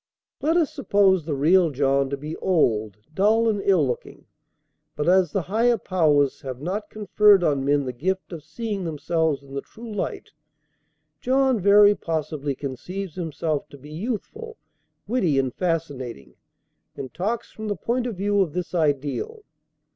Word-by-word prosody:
Let 320 +3 +2
us 325 -4 +1
suppose 200 - +2
the 155 -3 -2
real 165 +5 +4
John 135 -1 +1
to 140 - -3
be 150 +3 -6
old, 110 - +1 0.2
dull 220 +5 +3
and 210 -3 +1
ill 185 -7 +3
looking. 125 -2 -5 0.7
But 150 +1 -2
as 180 -3 +4
the 195 - -1
Higher 230 +6 +2
Powers 150 -8 +1
have 130 -2 -6
not 195 +8 -4
conferred 210 -2 +4
on 145 -4 +1
men 140 0 +2
the 125 - -4
gift 185 +8 -3
of 160 -3 -7
seeing 200 +5 -4
themselves 160 -2 -1
in 135 0 -14
the 140 - -3
true 225 -1 -11
light, 205 - -4 0.9
John 260 -1 +2
very 205 +1 +6
possibly 155 -5 -3
conceives 170 +8 -6
himself 160 -3 -3
to 140 - -12
be 145 +2 -13
youthful, 255 - -5 0.5
witty, 200 - +1
and 130 -2 0
fascinating, 145 - -3 0.6
and 130 -2 -7
talks 215 +6 -3
from 220 0 -7
the 205 - -1
point 240 +7 -1
of 230 - -4
view 205 +1 +1
of 165 -6 -1
this 180 0 -4
ideal. 160 - -1
175 Hz, 160 wpm, -24 LUFS, 145-205 Hz, 0.9 s, very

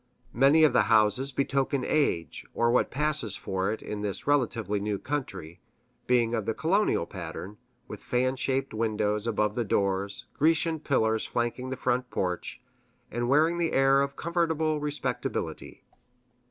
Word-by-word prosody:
Many 140 +5 +5
of 155 - +5
the - - +4
houses 115 +5 +3
betoken 135 0 0
age, 110 - 0
or 120 0 +2
what 125 - +2
passes 150 -6 0
for 95 0 -2
it 110 - -5
in 105 -1 -5
this 105 -2 -3
relatively 115 -8 +1
new 105 0 -2
country, 95 - -5 0.5
being 120 -2 +2
of 110 -2 -2
the 110 - 0
colonial 170 - +1
pattern, 90 +3 -8 0.3
with - - -9
fan 130 +1 0
shaped 135 0 -1
windows 105 -1 -1
above 105 -2 0
the 120 - -1
doors, 100 -1 -1
Grecian 160 +1 +2
pillars 110 -7 +1
flanking 120 +2 -2
the 130 - -4
front 125 0 -1
porch, 90 +6 -3 0.5
and 120 +1 -2
wearing 160 +5 +3
the 170 -1 0
air 135 0 +4
of 140 0 -2
comfortable 160 -2 0
respectability. 150 0 -4
125 Hz, 150 wpm, -28 LUFS, 105-145 Hz, 0.5 s, Many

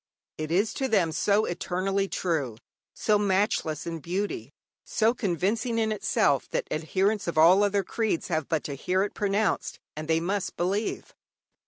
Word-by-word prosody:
It 155 0 -3
is 200 +6 +2
to 265 - -1
them 195 -9 +2
so 205 +6 +2
eternally 190 +3 -1
true, 150 - -2 0.3
so 210 -1 +1
matchless 190 -6 0
in 165 -1 -4
beauty, 170 - -3 0.3
so 220 +2 +2
convincing 215 - -1
in 220 -1 +1
itself, 145 -9 +1
that - - -2
adherents 190 +7 0
of 170 - -2
all 175 +5 +7
other 205 -1 +2
creeds 220 -2 -1
have 160 -3 -1
but 160 -3 0
to 145 - -4
hear 180 +7 0
it 205 - -3
pronounced 205 0 0 0.2
and 155 +1 -6
they 160 0 +3
must 190 +3 -2
believe. 195 +5 -2
190 Hz, 160 wpm, -27 LUFS, 160-205 Hz, 0.3 s, all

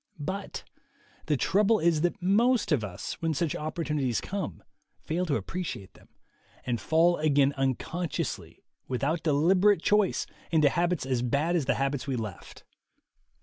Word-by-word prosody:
But 190 +7 -5 0.6
the 150 -2 +2
trouble 210 - +3
is 165 -3 +2
that 175 +1 0
most 220 +5 +2
of 140 -8 +2
us, 95 -4 -6
when 165 -1 0
such 155 +1 -1
opportunities 150 -5 -1
come, 190 - -5 0.4
fail 175 +3 -1
to 145 - +1
appreciate 170 - -5
them, - - -20 0.6
and 120 -2 -1
fall 170 +2 +3
again 145 -2 +3
unconsciously, 135 - -3 0.2
without 140 +6 -1
deliberate 175 +5 +3
choice, 210 -2 +2 0.2
into 155 -3 +4
habits 175 -1 0
as 130 -2 0
bad 140 +8 +1
as 160 -6 +1
the - - +1
habits 135 0 -1
we 135 - -1
left. 110 -6 -7
155 Hz, 145 wpm, -28 LUFS, 135-175 Hz, 0.6 s, into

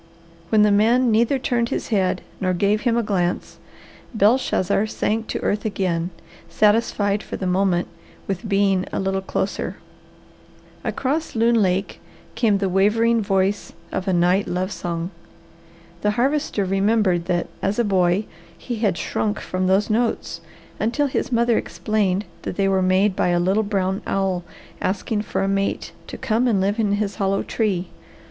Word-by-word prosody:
When 215 -1 +5
the 210 - +4
man 230 +4 +4
neither 235 +5 +3
turned 240 -2 0
his - - -3
head 190 -4 +1 0.2
nor 185 -1 0
gave 205 +4 +1
him 235 -2 +1
a 235 - +1
glance, 180 -4 -2 0.6
Belshazzar 210 -2 +2
sank 220 +1 -1
to - - -3
earth 210 - 0
again, 180 -5 -1 0.4
satisfied 205 +1 +2
for - - -6
the 190 - -4
moment 180 -1 +1 0.4
with 195 +3 -4
being 195 -2 +2
a - - -2
little 195 0 -1
closer. 190 +1 -3 1.1
Across 295 +3 -2
Loon 230 0 +3
Lake 190 0 0 0.3
came 215 -4 +2
the 195 0 0
wavering 220 +5 +3
voice 195 0 0 0.2
of 190 - -3
a - - +2
night 180 +3 +2
love 185 +2 -2
song. 170 0 -4 0.9
The 210 +1 0
Harvester 270 -5 +1
remembered 195 -2 +2
that 175 -1 0 0.2
as 195 +2 0
a 240 - +3
boy 190 -1 +2 0.3
he 240 -2 -5
had 205 -5 +1
shrunk 210 0 -2
from 185 0 -2
those 195 +3 +2
notes 230 +1 -1 0.4
until 235 +7 +1
his 260 - -2
mother 235 -1 +3
explained 205 -2 -1 0.2
that - - -5
they 195 0 +1
were 190 -1 +2
made 185 +2 +3
by - - +1
a 175 0 +2
little 190 +5 +2
brown 195 -2 -1
owl 190 -2 0 0.4
asking 205 +3 -1
for 200 - -2
a - - 0
mate 195 0 -1 0.2
to - - -7
come 230 +3 +1
and 215 -5 +2
live 200 +4 0
in 205 -2 +2
his 205 -1 -1
hollow 195 0 0
tree. 190 -6 -1
200 Hz, 160 wpm, -22 LUFS, 190-220 Hz, 1.1 s, When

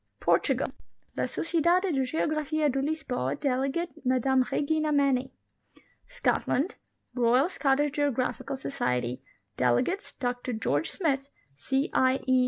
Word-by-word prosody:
PORTUGAL. - - +1 0.4
La - - 0
Sociedade 340 +2 +1
de 270 -1 +1
Geographia 310 +1 0
de 270 +1 -1
Lisboa; 265 - -2
delegate, 275 +5 0
Mme 260 0 +3
Regina 310 +1 +1
Maney. 270 -3 +2 0.8
SCOTLAND. 375 - 0 0.4
Royal 250 +4 +3
Scottish 290 -4 +1
Geographical 280 -1 -1
Society; 125 - -2 0.4
delegates, 125 - +1
Dr 245 0 -3
George 160 -9 0
Smith, 275 -6 -1 0.3
C. 265 - -1
I. 260 +1 +3
E. 260 0 +4
270 Hz, 110 wpm, -28 LUFS, 250-305 Hz, 0.8 s, E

